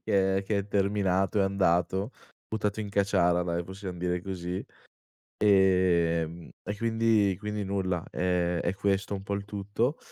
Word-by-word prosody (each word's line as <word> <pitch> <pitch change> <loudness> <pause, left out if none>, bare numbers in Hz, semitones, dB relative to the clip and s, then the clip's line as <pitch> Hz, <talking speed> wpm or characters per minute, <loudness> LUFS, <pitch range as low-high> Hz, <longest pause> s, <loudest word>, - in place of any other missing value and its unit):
che 95 -1 +2
è - - -3
che 100 0 0
è 100 - -3
terminato, 100 -1 +1
è - - +4
andato, 95 +2 +1 0.4
buttato 110 -1 -2
in 105 - -4
caciara 90 -3 +2
dai, 85 0 -2
possiam 95 -1 -7
dire 90 0 -1
così. 90 -1 -4 0.8
Ehm, 85 -4 +3
e 105 - -4
quindi 110 -3 +2
quindi 105 -1 -3
nulla, 95 -3 -1
ehm, 90 -1 0
è 90 - -1
questo 100 0 0
un 95 - -5
po' 100 +1 -3
il 100 0 -3
tutto, 105 +7 -2
95 Hz, 155 wpm, -28 LUFS, 90-100 Hz, 0.8 s, è